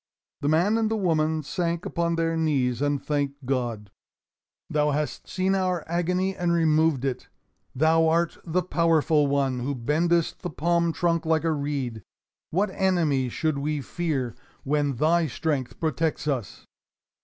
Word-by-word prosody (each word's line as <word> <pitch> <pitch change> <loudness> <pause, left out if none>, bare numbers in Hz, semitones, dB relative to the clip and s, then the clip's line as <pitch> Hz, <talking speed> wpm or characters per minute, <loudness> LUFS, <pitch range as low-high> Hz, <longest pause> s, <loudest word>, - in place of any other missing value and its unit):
The 145 - 0
man 180 +8 +3
and 220 -1 +1
the 220 - 0
woman 160 -5 +1
sank 170 +2 -2
upon 170 -1 0
their 165 0 0
knees 135 -6 +1
and 145 -1 +1
thanked 145 -2 -2
God. 120 -6 -2 0.8
"Thou 150 0 +1
hast 150 +1 -2
seen 190 +1 0
our 185 -3 0
agony 180 +3 0
and 175 -1 0
removed 160 -4 +2
it. 130 -2 -3 0.5
Thou 160 +3 +4
art 165 +1 +1
the 180 +2 0
Powerful 160 -4 +2
One 135 -2 0
who 135 +3 -2
bendest 160 +7 +1
the 180 - -3
palm 170 +2 +1
trunk 170 +1 0
like 160 -1 +1
a 165 - +1
reed. 140 -6 -3 0.5
What 190 +4 0
enemy 165 -10 +1
should 155 +3 -1
we 150 +1 -1
fear 140 -9 -2 0.3
when 145 -1 0
Thy 160 +5 +2
strength 135 -3 -2
protects 160 0 -1
us?" 130 -8 -3
155 Hz, 150 wpm, -25 LUFS, 140-170 Hz, 0.8 s, Thou